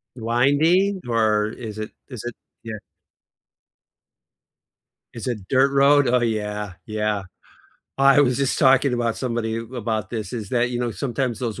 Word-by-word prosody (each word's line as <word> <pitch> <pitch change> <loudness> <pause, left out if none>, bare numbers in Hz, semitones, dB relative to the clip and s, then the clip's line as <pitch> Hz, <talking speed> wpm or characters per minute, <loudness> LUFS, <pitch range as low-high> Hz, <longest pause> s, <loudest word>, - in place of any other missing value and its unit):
Winding, 145 - +2
or 110 -2 +2
is 110 -2 -8
it 110 +1 -5 0.2
is 125 -5 -7
it 120 0 -5 0.3
Yeah. 110 -2 -6 2.4
Is 115 0 -6
it 105 -6 -4
dirt 135 +1 +3
road? 140 0 +5
Oh, 125 0 +3
yeah, 105 -3 -2
yeah. 105 -2 -1 0.8
I 135 +1 +6
was 125 -3 +3
just 140 -1 0
talking 135 -1 +4
about 115 -2 -1
somebody 115 -3 -2
about 115 -2 -4
this 110 -5 -5
is 110 -5 -5
that, 120 +1 +1
you 120 -1 -2
know, 120 -1 -1
sometimes 125 0 -2
those 115 -5 -4
120 Hz, 145 wpm, -22 LUFS, 110-130 Hz, 2.4 s, I